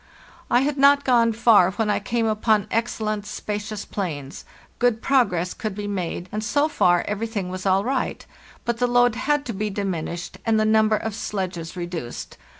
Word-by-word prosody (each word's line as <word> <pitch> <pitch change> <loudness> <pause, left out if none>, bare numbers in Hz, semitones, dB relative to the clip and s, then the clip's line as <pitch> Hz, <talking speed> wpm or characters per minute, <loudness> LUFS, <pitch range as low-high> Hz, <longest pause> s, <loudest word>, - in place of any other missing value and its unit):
"Y 245 - +4
had 285 0 -1
not 280 +1 +6
gone 235 -3 +4
far 220 -5 +5
when 220 +2 -1
I - - +1
came 230 +3 -1
upon 215 -1 +2
excellent 215 -2 -1
spacious 210 0 -5
plains; 150 -9 -5 0.3
good 240 -2 +2
progress 205 -10 +1
could 215 -4 -5
be 205 0 -5
made, 185 -3 -3
and 215 +1 -3
so 285 +6 +2
far 175 - +2
everything 210 -2 -3
was 185 +1 -4
all 190 +1 +3
nght; 260 +3 -1 0.4
but 235 -1 -1
the 245 - +2
load 245 -1 +4
had 285 +5 0
to 235 - -4
be 210 +2 -2
diminished 180 -3 -4
and 225 -1 +2
the 215 - +2
number 215 0 +4
of 220 0 -4
sledges 185 -6 -4
reduced. 175 -8 -6
215 Hz, 175 wpm, -23 LUFS, 190-235 Hz, 0.4 s, not